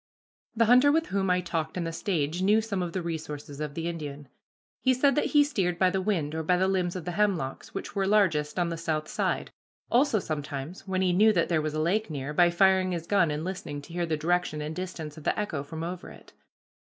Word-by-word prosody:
The 230 +1 +4
hunter 250 +5 +6
with 320 +1 +1
whom 195 -1 0
I 180 0 +3
talked 165 -1 -3
in 180 - -1
the 165 - -3
stage 165 -2 -1
knew 205 +3 +4
some 215 -4 -2
of 175 -1 -2
the 185 0 -3
resources 150 -3 -5
of 150 -1 -4
the 165 0 -3
Indian. 145 -4 -6 0.5
He 260 -1 +3
said 275 +2 +3
that 295 - +1
he 295 -1 +5
steered 190 - -1
by 185 0 +3
the 190 - 0
wind, 170 -7 -1
or 160 - -2
by 180 +3 +2
the 190 +1 +2
limbs 185 -2 0
of 180 - -5
the 180 - -2
hemlocks, 175 -9 -1
which 195 - -5
were 195 -1 +1
largest 175 -8 +2
on 175 -1 +1
the 165 - -3
south 155 -2 -2
side; - - -1 0.4
also 250 -1 +4
sometimes, 155 0 -5
when 190 0 0
he 180 -1 +2
knew 215 +4 +5
that 170 -4 +1
there 165 -3 +2
was 155 0 -3
a - - -1
lake 190 +7 +1
near, 145 -1 -4
by 175 +2 +5
firing 185 +1 +3
his 170 -1 -4
gun 190 -3 +3
and 150 +1 -2
listening 180 -5 -5
to 165 - -12
hear 175 -1 -1
the 160 -1 0
direction 170 0 0
and 150 +1 -4
distance 170 -4 -6
of - - -14
the - - 0
echo 175 -9 -2
from 160 +3 -6
over 180 +2 -5
it. - - -15
175 Hz, 240 wpm, -28 LUFS, 155-195 Hz, 0.5 s, hunter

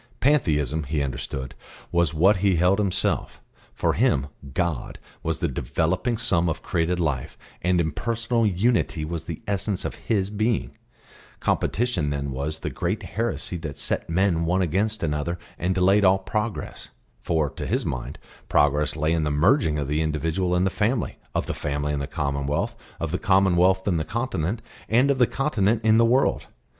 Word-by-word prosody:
Pantheism, 80 - +2
he 70 +1 -1
understood, 65 -1 -4 0.4
was 85 -3 +2
what 95 +6 +4
he 95 0 +2
held 90 +4 +3
himself; 100 -3 0 0.3
for - - 0
him 70 +1 +2 0.3
"God" 85 -7 -1 0.2
was 80 0 -1
the 85 - 0
developing 90 - -1
sum 90 -7 +1
of 80 - -4
created 90 0 0
life, 70 -7 -2 0.2
and 90 0 +2
impersonal 115 +9 0
Unity 100 -5 +1
was 80 0 -4
the 85 -2 -6
essence 100 -1 -1
of - - -2 0.2
His 100 -3 +1
being; 110 +1 0 0.7
competition 105 -10 0
then 70 -1 -2
was 70 +4 -3
the - - -3
great 90 +5 -2
heresy 115 -5 -2
that 80 -4 -6
set - - -2
men 85 -1 +2
one 90 +3 +2
against 100 +6 0
another 75 +2 -1 0.2
and 90 +3 0
delayed 95 +3 +4
all 95 0 +6
progress; 105 +3 -4 0.3
for, 80 -3 +1
to - - -6
his - - 0
mind, 65 -2 -4 0.3
progress 75 +1 +3
lay 80 +1 +1
in 80 -2 +1
the 75 - 0
merging 80 - +3
of 70 -2 -2
the 75 +2 0
individual 80 +4 0
in 90 - +2
the 95 - +1
family, 110 +3 -1 0.2
of - - 0
the - - -3
family 75 0 -2
in 70 - -1
the 70 - -3
commonwealth, 70 +1 -1 0.3
of 80 -1 -3
the 90 - -1
commonwealth 95 0 +3
in 90 -4 +2
the 80 - 0
continent, 110 -1 -2 0.3
and 125 +5 +4
of 135 - -1
the 125 - +5
continent 115 -6 +1
in 110 0 +5
the 115 - +6
world. 125 +4 +2
90 Hz, 170 wpm, -24 LUFS, 75-105 Hz, 0.7 s, all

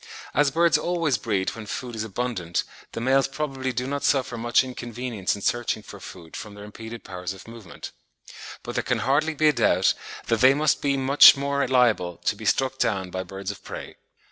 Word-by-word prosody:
As 145 -1 +3
birds 165 +1 +3
always 165 -8 0
breed 100 -4 -1
when 110 -2 -9
food 125 +2 -5
is 110 - -3
abundant, 105 -6 -2 0.3
the - - -4
males 130 +3 +3
probably 135 -2 -3
do 125 +1 -3
not 140 +1 -3
suffer 130 -3 +1
much 120 +2 +2
inconvenience 120 -5 -4
in 100 - -9
searching 120 -3 -1
for - - -11
food 85 -3 -11
from 105 0 -8
their 105 - -10
impeded 110 +2 -9
powers 90 -1 -5
of 95 - -14
movement; 115 -4 -10 0.7
but - - -6
there - - -1
can 125 - 0
hardly 150 +4 +1
be 155 +1 +4
a - - +2
doubt - - +3 0.3
that 115 0 0
they 130 +1 +7
must 155 +2 +2
be 140 -1 +1
much 135 +1 +8
more 140 0 0
liable 115 -9 +2
to - - -1
be 110 +1 -10
struck 130 +4 +1
down 95 -5 0
by 95 - -3
birds 95 +1 -6
of 100 - -13
prey. - - -8
120 Hz, 200 wpm, -25 LUFS, 105-135 Hz, 0.7 s, much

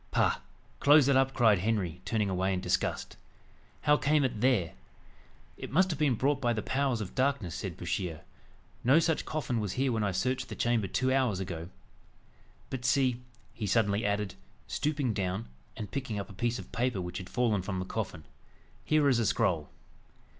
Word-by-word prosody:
"Pah! - - +2 0.4
close 145 -1 +6
it 140 - +4
up," 135 0 +4
cried 110 -6 +5
Henry, 95 -4 -1
turning 110 -3 0
away 95 0 0
in - - -1
disgust. - - -1 0.6
"How 150 0 +4
came 150 +1 +2
it 120 -5 -1
there?" 120 -10 +2 0.8
"It - - -7
must 185 +5 +3
have 155 - -4
been 145 -5 +3
brought 140 +4 +1
by 120 -2 +2
the 110 - -3
powers 130 -3 0
of 95 - -6
darkness," 130 - 0
said - - -5
Bouchier; 85 -5 -3 0.6
"no 135 +5 +5
such 165 -1 +2
coffin 125 -6 -2
was 105 -4 -2
here 130 +3 +1
when 110 -2 0
I 100 - +1
searched 125 +8 -1
the - - -5
chamber 120 -4 +1
two 130 +5 +1
hours 125 -8 +1
ago. 85 -2 -5 1.0
But 130 -2 -4
see," 125 -1 +2 0.3
he 105 - -4
suddenly 105 0 +2
added, 100 -2 -1 0.3
stooping 145 -6 -1
down, 95 +1 -2 0.3
and 105 - -6
picking 125 -6 -3
up 100 - -6
a - - -10
piece 120 +5 -1
of - - -10
paper 120 -3 0
which 90 +1 -4
had 95 -1 -9
fallen 115 -6 +1
from 95 0 -4
the 90 - -3
coffin, 80 -3 -4 0.6
"here 155 -2 +3
is 130 -4 +4
a 115 - +1
scroll." 80 -5 +1
115 Hz, 185 wpm, -30 LUFS, 95-135 Hz, 1.0 s, close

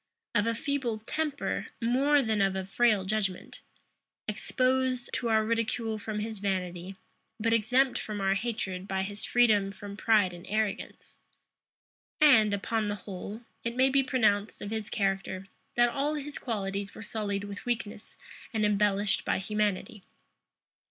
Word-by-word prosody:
Of 215 0 +2
a 230 - +1
feeble 270 -5 -1
temper, 295 +6 -2
more 270 +5 +3
than 220 -3 +1
of 195 -1 +2
a 190 -1 -2
frail 210 0 +3
judgment; 195 -2 -2 0.7
exposed 255 +3 0
to 235 - -1
our 220 -1 +3
ridicule 230 -1 -1
from 210 -1 -3
his 220 -1 -4
vanity; 185 -1 -2 0.4
but 225 +1 +2
exempt 250 +4 +3
from 210 -1 -4
our 195 0 +2
hatred 195 -4 -3
by 190 -1 0
his 205 +1 -5
freedom 215 -5 +4
from 200 +1 -8
pride 210 -4 +3
and 175 +1 -11
arrogance. 215 -1 -3 1.0
And, 250 -9 +7
upon 210 +2 0
the 205 - -1
whole, 200 +3 -6 0.2
it 235 0 -2
may 260 +1 +4
be 275 +1 +4
pronounced 220 -6 +1
of 205 - -6
his 220 -1 -3
character, 195 -1 -1 0.3
that 240 0 +5
all 285 +4 0
his 295 0 -5
qualities 200 -4 -3
were 220 - -8
sullied 205 -3 -2
with 205 +4 -7
weakness 220 -3 -3 0.4
and 215 -1 +3
embellished 205 -1 +2
by - - +1
humanity. 210 0 -1
215 Hz, 150 wpm, -29 LUFS, 200-240 Hz, 1.0 s, And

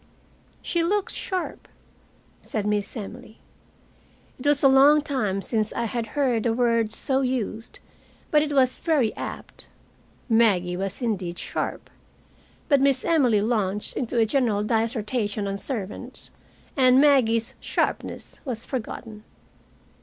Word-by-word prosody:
"She 340 -1 0
looks 400 +3 0
sharp," 370 -2 -4 0.7
said 215 -2 -4
Miss 210 +3 -1
Emily. 215 +1 -9 1.0
It 255 - -3
was 290 -1 +3
a - - +8
long 280 +3 +6
time 210 -10 -1
since 215 -2 0
I 235 - -1
had 230 0 -3
heard 255 -5 +2
the 230 0 +1
word 230 -2 +1
so 265 +4 0
used, 245 -4 -3 0.5
but 300 - +5
it 300 -1 -2
was 260 -3 +2
very 290 -10 +1
apt. - - -8 0.6
Maggie 205 -7 +3
was 195 +5 -3
indeed 185 -7 -2
sharp. - - -4 0.8
But 280 -3 +4
Miss 275 -2 +2
Emily 255 -11 +3
launched 210 -3 0
into 245 -1 -2
a 225 - +5
general 220 -4 +1
dissertation 220 -1 -1
on 200 0 -3
servants, 210 -7 -6 0.4
and 255 -1 +5
Maggie's 255 -4 +3
sharpness - - -3
was 245 -5 -5
forgotten. 225 -3 -6
235 Hz, 130 wpm, -25 LUFS, 215-270 Hz, 1.0 s, a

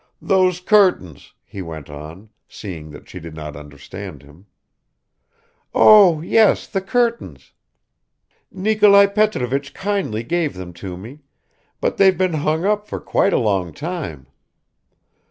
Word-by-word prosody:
"Those 185 -2 +1
curtains," 180 - +1
he 100 - -9
went 80 -4 -8
on, 80 +8 -11 0.2
seeing 85 -7 -9
that 75 - -13
she 90 - -9
did 80 -1 -10
not 75 -2 -8
understand 75 +3 -10
him. 75 +8 -19 1.3
"Oh, 195 -7 +6
yes, 215 +5 +3
the 195 - -3
curtains; 235 +3 -2 1.0
Nikolai 205 0 +4
Petrovich 145 - -1
kindly 190 - -2
gave 170 +3 -2
them 90 -1 -9
to 90 +1 -8
me, 115 +10 -11 0.6
but - - -2
they've 190 -3 +4
been 185 -1 0
hung 155 +3 -1
up 210 0 0
for - - -5
quite 195 - 0
a - - +2
long 95 -7 -1
time." 150 - -6
140 Hz, 130 wpm, -19 LUFS, -, 1.3 s, Oh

